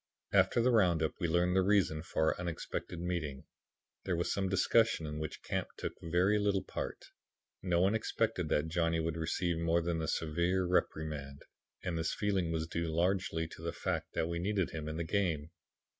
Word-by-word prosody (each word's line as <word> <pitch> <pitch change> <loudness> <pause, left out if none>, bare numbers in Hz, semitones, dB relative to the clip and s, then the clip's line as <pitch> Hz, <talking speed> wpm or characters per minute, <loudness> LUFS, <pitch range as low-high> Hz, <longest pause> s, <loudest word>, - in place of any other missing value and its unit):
After 120 - +4
the 125 - +4
roundup 85 -8 +3
we 85 - +1
learned 90 +2 +2
the 95 - +5
reason 95 -5 +2
for 80 -1 +1
our - - -13
unexpected 90 0 -4
meeting. 85 -6 -3 0.6
There 90 - 0
was 85 - 0
some 95 -1 0
discussion 110 -1 +3
in 75 0 -4
which 80 -1 -5
Camp - - -2
took - - -3
very 90 +5 +2
little 100 -2 +1
part. - - -5 0.6
No 90 -2 +2
one 95 +3 +4
expected 110 -6 0
that 75 +1 +2
Johnny 85 0 +1
would 80 0 -1
receive 85 +1 -1
more 85 +1 +2
than 85 -1 -1
a 80 - -2
severe 85 +4 +1
reprimand 75 -5 -1 0.4
and 85 -2 -2
this 80 - -1
feeling 95 -5 0
was 80 -1 -1
due 85 0 -2
largely 85 0 0
to 80 - -11
the 85 -1 -3
fact - - -3
that 80 - 0
we 85 0 -2
needed 95 0 0
him 75 -1 -4
in 80 - -4
the 85 - -1
game. 85 -4 0
85 Hz, 190 wpm, -33 LUFS, 80-95 Hz, 0.6 s, the